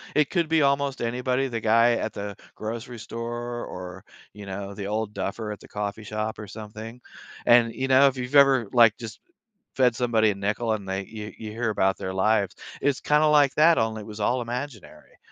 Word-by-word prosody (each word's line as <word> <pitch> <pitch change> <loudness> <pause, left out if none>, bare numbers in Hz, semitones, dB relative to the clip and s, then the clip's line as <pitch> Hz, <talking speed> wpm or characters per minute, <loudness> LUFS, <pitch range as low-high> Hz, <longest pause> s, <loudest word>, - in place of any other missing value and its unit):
It 150 -2 +3
could 170 -3 0
be 160 -1 +3
almost 140 -1 +1
anybody, 125 +3 0
the 115 -3 -3
guy 115 +2 +4
at 110 -2 -3
the 100 0 -6 0.2
grocery 115 +2 -6
store 120 +2 -5
or, 90 0 -8 0.3
you 105 -1 -10
know, 100 +1 -6
the 100 -1 -5
old 105 0 -2
duffer 105 +2 -4
at 105 - -7
the - - -15
coffee 105 +1 -4
shop 110 +1 -4
or 105 - -7
something, 110 +3 -9 0.4
and, 120 -1 +5
you 130 - -2
know, 135 +1 +6
if 135 -1 -1
you've 125 +2 -4
ever, 135 -5 +6
like, 115 -3 +6
just 115 -3 -8 0.6
fed 125 -3 +3
somebody 115 -3 +2
a - - -5
nickel 105 +4 -1
and 100 -3 -5
they 95 0 -2
you 105 0 -8
you 110 -1 -7
hear 115 +1 -2
about 95 -2 +1
their 95 - -4
lives, 100 0 +1 0.3
it's 140 -1 +1
kinda 150 +1 +3
like 145 -2 +4
that 165 +2 +5
only 110 -1 -1
it - - -10
was 105 0 -9
all 120 +5 +1
imaginary. 120 -1 -7
115 Hz, 205 wpm, -25 LUFS, 105-125 Hz, 0.6 s, know